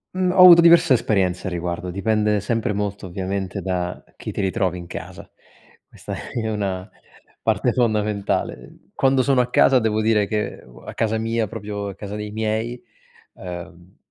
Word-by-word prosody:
Mhmm, 185 -1 +1
ho 185 0 +4
avuto 175 -2 +10
diverse 170 -3 +6
esperienze 95 -7 0
a - - 0
riguardo, 90 0 -4
dipende 105 +2 0
sempre 110 0 -1
molto 100 -1 -3
ovviamente 95 +1 -4
da 90 -1 -3
chi - - -6
ti - - -2
ritrovi 95 -2 0
in 85 -1 -9
casa. - - -9 0.6
Questa - - -9 0.2
è 110 -2 -3
una 100 -2 -3 0.5
parte 110 +2 +1
fondamentale. 105 - -2
Quando 135 -1 +2
sono 135 0 +2
a 125 - -2
casa 130 +1 +5
devo 110 -2 0
dire 105 -2 +2
che 105 -1 -3
uo - - -16
a - - -8
casa 110 0 0
mia, 115 0 -1
proprio 105 -2 -5
a 100 - -7
casa 105 0 -7
dei 105 0 -5
miei, 110 +3 -2 0.5
ehm, 90 0 -10
105 Hz, 165 wpm, -22 LUFS, 95-115 Hz, 0.6 s, avuto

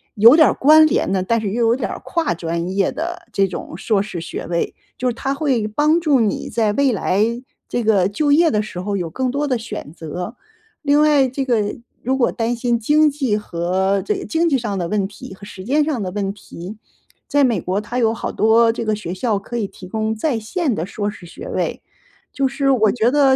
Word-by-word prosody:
有 230 +7 +8
点 315 - +7
儿 - - +1
关 310 +3 +6
联 240 - 0
的， 190 -1 +1
但 230 +3 +1
是 200 -3 -2
又 235 +1 +1
有 230 - +4
点 265 - -3
儿 - - -6
跨 330 - 0
专 170 +1 -3
业 195 -1 +2
的 345 +2 -5
这 195 - +3
种 180 - -7
硕 200 -1 +1
士 190 -5 -5
学 - - -6
位。 170 0 -1 0.2
就 250 0 0
是 - - -2
它 270 +3 -2
会 265 -7 0
帮 300 +9 +2
助 295 -6 +3
你 210 - -1
在 220 -3 +1
未 280 0 +2
来， 200 +1 +1 0.4
这 240 - -2
个 200 -4 +3
就 285 +9 0
业 325 +2 +5
的 210 -1 +1
时 195 -4 -7
候 200 +2 -2
有 175 -3 -3
更 255 +8 -2
多 290 +2 -1
的 255 -3 +1
选 220 -9 -7
择。 175 +7 -6 0.5
另 290 +1 +4
外 290 -3 +4
这 270 +2 -3
个， 215 -5 0 0.3
如 260 +3 +1
果 245 - +2
担 230 +1 -1
心 235 0 0
经 300 +6 +4
济 270 -7 -1
和 190 +1 0
这 420 - 0
个 385 - -5
经 335 +1 +1
济 280 -5 +3
上 210 -5 -3
的 175 -2 -2
问 200 -1 0
题 200 -1 -11
和 200 - -18
时 190 -2 -10
间 295 +4 +2
上 290 -7 -1
的 185 -2 -3
问 195 -1 -2
题， 195 0 -10 0.5
在 285 -1 +3
美 240 -4 +2
国 190 +3 -2
它 240 +4 -5
有 225 -2 +2
好 - - -4
多 225 +1 +4
这 230 0 -4
个 215 -1 +1
学 185 -4 -5
校 205 +1 0
可 240 +4 -6
以 205 -4 -1
提 185 - -12
供 220 +2 -2
在 235 0 -1
线 285 - -1
的 165 - -2
硕 205 +1 -3
士 185 -4 -10
学 435 - -9
位。 - - -2 0.5
就 275 -1 0
是 275 +1 0
我 220 -5 +3
觉 235 0 +2
得 275 -2 +4
225 Hz, 250 characters per minute, -20 LUFS, 200-275 Hz, 0.5 s, 有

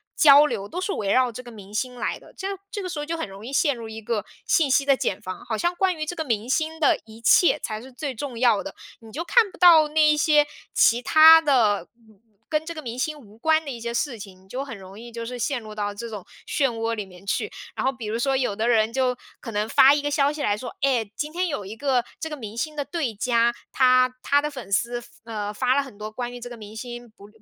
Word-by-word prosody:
交 290 -1 +8
流 220 -8 -3
都 350 - -5
是 370 +2 -2
围 200 - -2
绕 255 -1 +3
这 235 - -8
个 245 - -12
明 205 -2 -13
星 250 +3 -2
来 245 - -3
的， - - -17
这 385 - -4 0.2
这 410 0 -5
个 365 - -4
时 310 - -4
候 295 - -3
就 335 +2 -3
很 325 - -3
容 195 +1 -11
易 255 - -7
陷 285 0 +2
入 230 -2 -8
一 220 0 -8
个 215 -1 -2 0.2
信 315 -5 +3
息 275 +1 +3
的 275 - +4
茧 200 -6 -2
房， 185 -2 -7
好 220 - -2
像 345 +9 0
关 375 0 +1
于 310 - -3
这 355 - -5
个 320 - -2
明 230 -4 -2
星 320 +3 -1
的 300 - +3
一 220 0 -13
切 300 +5 +5
才 215 0 -4
是 260 +2 -12
最 275 +2 -5
重 250 0 -6
要 235 -4 +3
的， 295 - -8 0.2
你 225 -1 -14
就 320 +7 -4
看 430 +4 +4
不 - - -15
到 330 -4 +7
那 310 +1 +3
一 300 - +4
些 300 -1 +4 0.3
其 235 +1 +4
他 320 +5 +8
的 225 - +2 0.2
嗯 215 -2 -23 0.3
跟 305 -1 0
这 335 - -5
个 310 - -6
明 240 0 -6
星 305 +2 -2
无 215 -7 -16
关 315 +4 +2
的 280 - -4
一 240 - -7
些 235 +1 -4
事 240 -1 -2
情， 190 -2 -11
你 190 - -23
就 255 +7 -4
很 270 -6 -8
容 195 +2 -12
易 235 0 -10
就 230 0 -6
是 245 +1 -6
陷 260 +2 -1
入 215 -1 -10
到 205 -1 -2
这 235 +3 -6
种 205 -4 -7 0.2
漩 275 -3 +1
涡 230 -1 -2
里 215 -2 -3
面 180 0 -16
去。 200 - -2 0.2
然 - - -2
后 265 - +3
比 245 -4 -9
如 220 +2 -2
说， 270 +2 +1
有 250 -6 -1
的 220 +3 -1
人 225 -2 +3
就 255 -1 +1 0.2
可 230 - -8
能 210 0 -1
发 270 +4 +7
一 295 - -1
个 290 - -1
消 285 -1 +2
息 300 0 -6
来 205 - +2
说： 245 +1 -8
“哎， 245 -6 +1
今 300 +1 -4
天 360 +1 0
有 280 - -4
一 205 +3 -7
个 255 0 +1 0.2
这 320 - -4
个 300 - -5
明 220 -3 -8
星 305 +5 -3
的 290 - -2
对 295 -10 -3
家， 235 +2 +2 0.2
他 255 -1 +4
他 285 +2 +3
的 300 +1 -3
粉 255 -8 -9
丝， 240 +4 0 0.2
呃， 210 -3 -4
发 255 +4 +1
了 280 - +3
很 265 -7 -11
多 215 0 -6
关 245 +1 -5
于 245 - -8
这 245 - -7
个 240 - -9
明 215 -1 -11
星 240 +1 -8
不 205 -2 -16
245 Hz, 300 characters per minute, -24 LUFS, 220-295 Hz, 0.3 s, 交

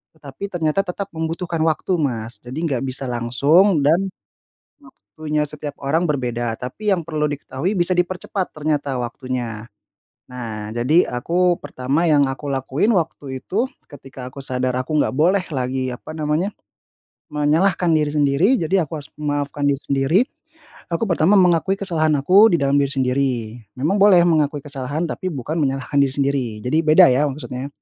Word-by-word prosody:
Tetapi 155 +6 -8
ternyata 165 +1 +1
tetap 190 +2 -4
membutuhkan 165 +1 -3
waktu, 160 +3 0
Mas. 115 -6 -3
Jadi 130 +7 -5
enggak 135 -7 -1
bisa 130 +1 -2
langsung 140 - +3
dan 180 +6 +3 0.7
waktunya 155 - -4
setiap 145 0 -7
orang 155 +5 +1
berbeda. 120 -5 -1
Tapi 205 +12 -3
yang 170 - -3
perlu 155 -2 -1
diketahui 145 +6 -3
bisa 175 +1 +1
dipercepat 180 +1 -2
ternyata 145 -3 -1
waktunya. 120 -2 -5 0.7
Nah, 110 -4 -6
jadi 145 +9 +3
aku 175 +8 +1
pertama 140 +2 -2
yang 145 -3 +4
aku 140 +2 -6
lakuin 135 - 0
waktu 140 -6 -2
itu, 225 +7 -1 0.2
ketika 135 -3 -10
aku 140 - -10
sadar 130 -1 -1
aku 130 +5 -5
nggak - - +1
boleh 180 +7 +3 0.2
lagi 130 0 -1
apa 125 - -9
namanya, 155 +5 -1 0.8
menyalahkan 165 +5 +2
diri 150 -2 +2
sendiri, 145 +4 +2
jadi 175 +2 +1
aku 160 - -5
harus 140 - -11
memaafkan 145 -1 -2
diri 140 0 0
sendiri. 140 +7 +2 0.7
Aku 170 - 0
pertama 170 +3 +3
mengakui 180 +1 +3
kesalahan 165 -6 0
aku 190 +9 +6
di - - +6
dalam 140 0 +2
diri 140 - +1
sendiri. 135 0 +1 0.5
Memang 155 +10 +1
boleh 190 -4 +7
mengakui 150 -3 +1
kesalahan 140 +3 -3
tapi 185 - -4
bukan 145 +3 -4
menyalahkan 135 0 -1
diri 135 -1 +2
sendiri. 140 -2 0 0.2
Jadi 140 +6 +1
beda 155 -3 +7
ya 140 +4 +2
maksudnya, 135 -1 -6
150 Hz, 155 wpm, -21 LUFS, 130-170 Hz, 0.8 s, boleh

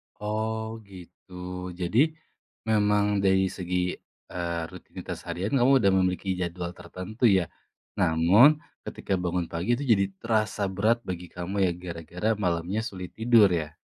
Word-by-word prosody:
Oh, 110 +1 -3
gitu. 90 0 -14 0.4
Jadi, 90 +6 0 0.7
memang 105 -1 +2
dari 95 0 +4
segi, 90 0 -2 0.5
eee, 85 -1 -2
rutinitas 90 - -8
harian 95 +4 -3
kamu 125 +2 +4
udah 100 - +5
memiliki 90 +1 0
jadwal 85 0 -3
tertentu 95 +7 -4
ya. 95 -4 +4 0.5
Namun 100 - +5 0.2
ketika 95 - -4
bangun 90 -1 -1
pagi 95 +9 0
itu 140 - -5
jadi 100 -1 +2 0.2
terasa 110 -2 0
berat 110 +5 +2
bagi 90 -1 -5
kamu 90 +3 -5
ya - - +1
gara-gara 85 +4 -4
malamnya 90 +4 0
sulit 95 -5 -7
tidur 110 -3 +5
ya? 75 -3 -2
95 Hz, 135 wpm, -27 LUFS, 90-110 Hz, 0.7 s, udah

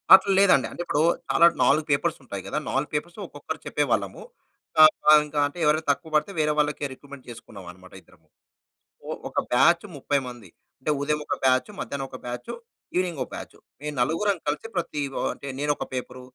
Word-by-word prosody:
అట్లా 195 +1 +2
లేదండి. 160 - +5
అంటే - - -6
ఇప్పుడు 150 - 0 0.3
చాలా 170 - +5 0.2
4 155 - +4
పేపర్స్ 155 +4 +1
ఉంటాయి 100 -6 -7
గదా! - - -2
4 140 +3 -1
పేపర్స్‌ని 170 +4 -4
ఒక్కొక్కరు - - -7
చెప్పేవాళ్ళము. - - -1 1.0
ఇంక 150 0 -13
అంటే 145 +4 -5
ఎవరైనా 155 +1 +2
తక్కువబడితే 155 +4 -1
వేరే 150 0 +2
వాళ్ళని 150 -1 0
రిక్రూట్‌మెంట్ 140 0 -13
చేసుకున్నామనమాట 95 -5 -12
ఇద్దరము. 80 -4 -25 0.8
ఒ - - -2 0.2
ఒక - - -4
బ్యాచ్ 170 +8 +4
30 140 +1 0
మంది. 120 -7 -11 0.3
అంటే 150 - -2
ఉదయం 150 +1 0
ఒక - - 0
బ్యాచు, 130 +8 +3
మధ్యాహ్నం 140 -1 -4
ఒక 130 - -8
బ్యాచు 120 0 -5 0.4
ఈవెనింగ్‌ 180 -5 -1
ఒక - - -16
బ్యాచు. - - -9 0.2
మేము 150 0 -5
నలుగురం 165 +10 +1
కలిసి 150 +9 -2
ప్రతి 150 -3 -2
వ - - -6 0.2
అంటే 140 - -9
నేను 145 +1 +1
ఒక - - -4
పేపర్, 125 0 -5
145 Hz, 170 wpm, -25 LUFS, 130-155 Hz, 1.0 s, లేదండి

